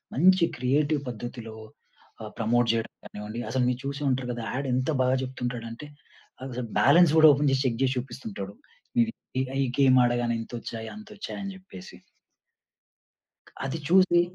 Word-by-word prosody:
మంచి 185 +4 +5
క్రియేటివ్ 145 +4 +1
పద్ధతిలో 120 -1 -7 0.7
ఆహ్, 110 -1 -7
ప్రమోట్ 115 +1 +2
చేయడం 115 -1 -2
గానివ్వండి. 105 +2 -7
అసలు 130 -1 +1
మీరు 125 0 -2
చూసే 140 +1 -4
ఉంటారు 130 -1 -1
కదా. 120 -1 -5
యాడ్ 140 +1 -2
ఎంత 130 +4 0
బాగా 130 +1 +2
చెప్తుంటాడంటే 125 0 -5 0.7
అసలు 125 -1 -4
బాలన్స్ 165 +8 +6
కూడా 155 0 +9
ఓపెన్ 145 +1 +2
జేసి 135 0 +1
చెక్ 120 -2 0
చేసి 130 0 +1
చూపిస్తుంటాడు. 110 -6 -6 0.5
ఈడు 235 -1 +3
హ్మ్. - - -33 0.3
ఇగ 130 - -3
ఈ - - 0
గేమ్ 130 -2 +6
ఆడగానే 120 -1 0
ఇంతొచ్చాయి 115 -1 -7
అంతొచ్చాయి 215 -1 -8
అని 195 -1 -5
జెప్పేసి. 185 - -12 1.7
అది 135 +4 -2
చూసి 180 -1 +5
130 Hz, 150 wpm, -27 LUFS, 120-150 Hz, 1.7 s, కూడా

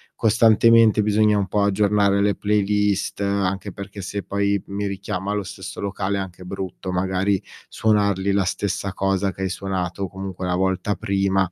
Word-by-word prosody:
costantemente 115 0 +5
bisogna 105 0 +3
un 100 -1 0
po' 105 -1 +1
aggiornare 100 0 +2
le 100 0 +2
playlist, 105 -1 0
anche 100 0 -1
perché 100 0 -8
se 100 +2 -4
poi 100 0 0
mi 100 +1 -3
richiama 100 0 -3
lo 105 -1 -1
stesso - - -8
locale 100 0 -2
è - - -1
anche 90 -1 -8
brutto, 95 0 -5
magari 95 +1 0 0.3
suonargli 100 -3 +1
la 100 -1 +2
stessa 95 +1 -2
cosa 95 0 0
che 95 - -9
hai 95 - 0
suonato 95 0 -3
comunque 95 -1 -6
la 90 0 0
volta 95 +2 0
prima. 95 -2 0
100 Hz, 160 wpm, -22 LUFS, 95-100 Hz, 0.3 s, costantemente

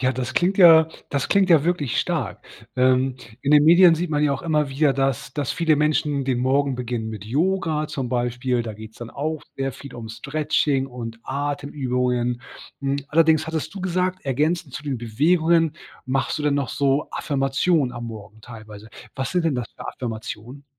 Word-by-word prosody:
Ja, 130 0 +2
das 130 0 -4
klingt 185 +3 +1
ja 165 -3 +8 0.2
das 140 -2 -2
klingt 195 -2 +3
ja 155 -4 +6
wirklich 160 -9 0
stark. - - -2 0.3
Ähm, 130 0 +3 0.2
in 140 - -1
den 150 0 +6
Medien 170 +1 +7
sieht 170 +1 -3
man 150 -1 +1
ja 150 -1 +3
auch 140 - -4
immer 150 -3 +1
wieder, 140 +1 +2
dass 135 -2 -1
dass 145 -4 -2
viele 160 -2 +2
Menschen 150 -2 +1
den 130 -2 0
Morgen 135 +2 +1
beginnen 120 -2 -3
mit 105 -2 -7
Yoga 160 - 0
zum 135 -5 -4
Beispiel. 120 0 -1
Da 110 -2 -6
geht's 110 +1 -12
dann 120 -1 -8
auch 155 +2 -3
sehr 135 0 -2
viel 135 +1 -11
um 115 -2 -8
Stretching 145 +2 0
und 115 -3 -7
Atemübungen. 125 -4 -2 0.4
Hm, 140 0 0
allerdings 160 0 +3
hattest 160 +2 -4
du 195 - -6
gesagt, 185 0 -1
ergänzend 150 +2 -1
zu - - -5
den 140 -4 -3
Bewegungen, 160 +7 +2 0.3
machst 135 +3 -1
du - - -4
dann 145 -1 +2
noch 140 -4 -1
so 140 +1 0
Affirmationen 135 0 0
am 120 -1 -6
Morgen 110 -1 -9
teilweise. 110 -2 -11 0.3
Was 130 0 -3
sind 180 -2 +1
denn 160 -4 +1
das 125 -2 -4
für - - -10
Affirmationen? 120 +3 -6
140 Hz, 185 wpm, -23 LUFS, 125-155 Hz, 0.4 s, ja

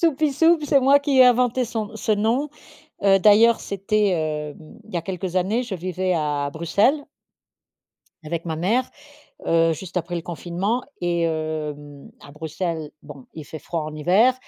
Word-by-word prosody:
soupie 310 -3 +2
soupe 325 -1 +5
c'est 280 -1 +3
moi 275 +2 +5
qui 280 0 -2
ai - - +10
inventé 250 0 +3
son 220 -2 -5
ce 220 - -3
nom. 225 +8 +1 0.6
Heu, 195 -1 +5
d'ailleurs, 220 +3 +5
c'était, 205 +1 0
hem, 155 +4 -4
il 220 - -16
y - - +1
a 165 - -2
quelques 185 0 -4
années, 205 +7 +1
je 215 -6 -5
vivais 185 +1 -2
à 145 -3 -1
Bruxelles 200 - +2 1.2
avec 165 +2 -4
ma 160 -2 -3
mère, 225 +10 0 0.6
heu, 165 0 +3
juste 175 +3 -8
après 175 0 -2
le 170 - -3
confinement. 180 +7 -3 0.2
Et, 175 -1 0
hem, 150 -3 -4
à 145 - -13
Bruxelles, 160 0 -4
bon, 140 -3 -12
il 155 -2 -8
fait 155 - -8
froid 165 +1 -4
en 155 0 -6
hiver 195 +11 +3
180 Hz, 170 wpm, -22 LUFS, 160-225 Hz, 1.2 s, ai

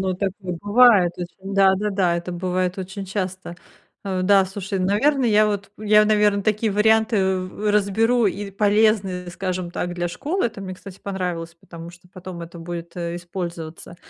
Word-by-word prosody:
ну 190 -1 -1
такое 190 -2 -4
бывает 205 -4 +5
очень. 190 +2 -7
Да-да-да, 195 -2 +3
это 170 +1 -5
бывает 180 +1 -2
очень 190 +1 -6
часто. 185 -2 -4 0.5
Э, 190 -2 -2
да, 195 +1 +5
слушай, 195 0 -4
наверно, 250 +9 +2
я 215 -2 +4
вот, 200 -1 -3
я, 210 0 +4
наверно, 210 -1 +3
такие 215 +1 0
варианты 215 -2 +3
в 185 +3 -3
разберу, 215 +3 +2
и 200 +1 -3
полезны, 200 -3 +1
скажем 185 -1 -4
так, 175 0 -3
для 175 0 -2
школы. 300 - -1
Там 200 -3 -10
мне, 185 -1 -6
кстати, 190 0 -12
понравилось, 180 -4 -4
потому 170 0 -11
что 175 +1 -19
потом 185 -1 -8
это 170 +1 -10
будет, 170 0 -7
э, 170 -1 -3
использоваться. 170 -1 -7
190 Hz, 160 wpm, -22 LUFS, 180-210 Hz, 0.5 s, бывает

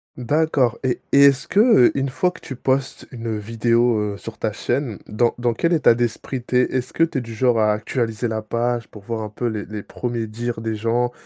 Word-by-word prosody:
D'accord. 135 -1 +1
Et 130 -2 0
et 140 0 +7
est-ce 140 +2 +3
que, 200 - +1
heu, 220 - +6
une 135 0 0
fois 180 +7 0
que 180 - -14
tu 130 - -7
postes 130 +1 -1
une 115 -3 -4
vidéo, 115 +1 +1
heu, 100 - -8
sur 115 +1 -9
ta 110 - -1
chaîne 120 +1 -2
dans 115 +3 +1
dans 120 -1 0
quel 170 +9 +1
état 150 -7 +5
d'esprit 120 +2 -3
tu 125 - -4
es? 125 - +6
Est-ce 125 -1 -2
que 165 - +2
tu 165 -4 0
es - - -4
du 115 -2 -8
genre 120 -1 +2
à 105 -1 +3
actualiser 115 +2 -2
la 110 -1 -2
page 120 +1 -2
pour 105 -2 -13
voir 115 +1 -4
un 105 - -5
peu 115 +3 -5
les 110 -2 -3
les 105 -1 -7
1ers 120 -2 -4
dires 115 +2 -4
des 110 -1 -3
gens, 115 +3 0
120 Hz, 235 wpm, -21 LUFS, 110-130 Hz, -, et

